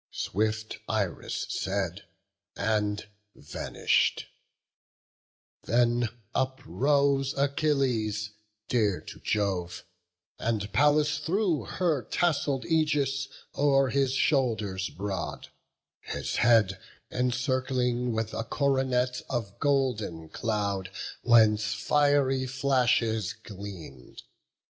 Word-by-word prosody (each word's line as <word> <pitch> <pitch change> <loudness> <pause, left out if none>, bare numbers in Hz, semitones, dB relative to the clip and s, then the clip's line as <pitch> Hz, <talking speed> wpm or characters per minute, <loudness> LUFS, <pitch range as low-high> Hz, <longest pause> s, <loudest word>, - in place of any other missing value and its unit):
Swift 110 +2 -2
Iris 100 -5 -2
said, - - -2 0.5
and 105 -1 0 0.3
vanish'd; 75 - 0 1.4
then 120 0 +2 0.2
uprose 135 +1 +1
Achilles, 135 -7 0 0.4
dear 105 -6 +1
to - - -11
Jove; 95 -4 -1 0.6
and 105 -3 -2
Pallas 150 +2 +3
threw 175 0 0
Her 165 -7 0
tassell'd 140 0 0
aegis 145 -4 +1 0.3
o'er 135 -2 +3
his 135 -2 +1
shoulders 115 - +1
broad; 95 -3 -5 0.5
His - - -4
head 110 -5 +4 0.3
encircling 125 0 0
with 110 -1 -2
a 115 - -2
coronet 130 -1 0
Of 115 -6 -3
golden 125 - 0
cloud, 100 -4 -2 0.3
whence 110 -2 +4
fiery 135 +2 +2
flashes 125 -6 +1
gleam'd. 100 - -10
120 Hz, 80 wpm, -28 LUFS, 105-140 Hz, 1.4 s, head